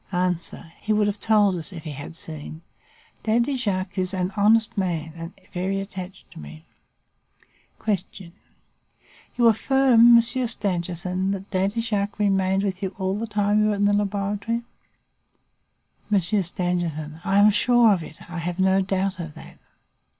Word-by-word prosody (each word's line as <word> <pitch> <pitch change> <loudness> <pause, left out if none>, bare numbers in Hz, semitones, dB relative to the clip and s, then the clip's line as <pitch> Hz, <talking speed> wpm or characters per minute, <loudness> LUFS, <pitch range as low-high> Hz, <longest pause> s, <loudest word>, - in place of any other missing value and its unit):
"A. 180 -1 +2 0.5
He 215 - 0
would 210 0 +3
have 205 0 -2
told 210 -3 +3
us 165 +3 -6
if 165 -4 -9
he 155 - -6
had 145 +3 -8
seen. 155 0 -8 0.6
Daddy 235 +5 +1
Jacques 195 -5 -2
is 185 +1 -1
an 185 +1 -2
honest 215 +2 +3
man 165 -5 -2
and 165 +1 -8 0.2
very 190 +2 -1
attached 190 -1 -8
to - - -12
me. 75 +2 -11 1.2
"Q. 190 -3 -3 1.1
You 240 - +3
affirm, 240 +1 +5
Monsieur 240 +2 +3
Stangerson, 185 -3 -2
that 195 +1 -7
Daddy 200 +4 0
Jacques 205 -2 -2
remained 195 -2 +1
with 190 -2 -2
you 190 -1 -4
all 190 -1 -1
the 220 +3 -3
time 210 0 +1
you 215 - +3
were 210 - +1
in 205 0 +1
the 205 - +3
laboratory? 205 +3 -1 1.5
"M. 205 - +5
Stangerson. 175 -4 -2
I 195 +1 +1
am 205 +1 +7
sure 240 0 +4
of 185 - -1
it. 155 - -11
I 175 -1 -6
have 175 +1 -4
no 190 0 +3
doubt 190 0 -1
of 165 -3 -7
that. - - -13
195 Hz, 155 wpm, -24 LUFS, 180-210 Hz, 1.5 s, am